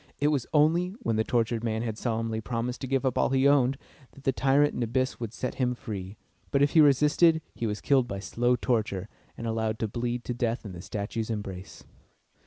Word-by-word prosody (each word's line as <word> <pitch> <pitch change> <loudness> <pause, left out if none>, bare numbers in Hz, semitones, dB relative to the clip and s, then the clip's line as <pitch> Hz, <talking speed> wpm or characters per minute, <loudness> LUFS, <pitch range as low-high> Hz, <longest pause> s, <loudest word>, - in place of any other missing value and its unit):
It 145 +2 +3
was 140 -5 0
only, 170 +5 +3
when 115 - 0
the 110 - +2
tortured 115 0 0
man 110 -1 -1
had 110 -2 -3
solemnly 115 -1 -2
promised 120 +2 -3
to 135 - -3
give 135 +1 0
up 130 - +1
all - - +3
he 135 +1 +3
owned, 135 -2 +3 0.4
that 140 - -16
the 135 - +2
tyrant 140 +3 +3
Nabis 125 +2 -1
would 115 -3 -4
set 125 - -4
him 125 -1 +1
free; 100 -3 -7 0.3
but 140 0 +3
if 145 - +3
he 160 - +6
resisted, 150 +3 +5
he 115 - -3
was 105 0 -3
killed 135 -3 +3
by 100 - -4
slow 120 +5 +1
torture, 110 -6 -1 0.3
and 115 - -6
allowed 110 -1 -1
to 110 - -1
bleed 120 +2 -3
to 125 - -3
death 120 -1 -2
in 100 - -6
the 85 -1 -8
statue's 105 +3 -4
embrace. 100 -4 -6
120 Hz, 210 wpm, -28 LUFS, 110-135 Hz, 0.4 s, he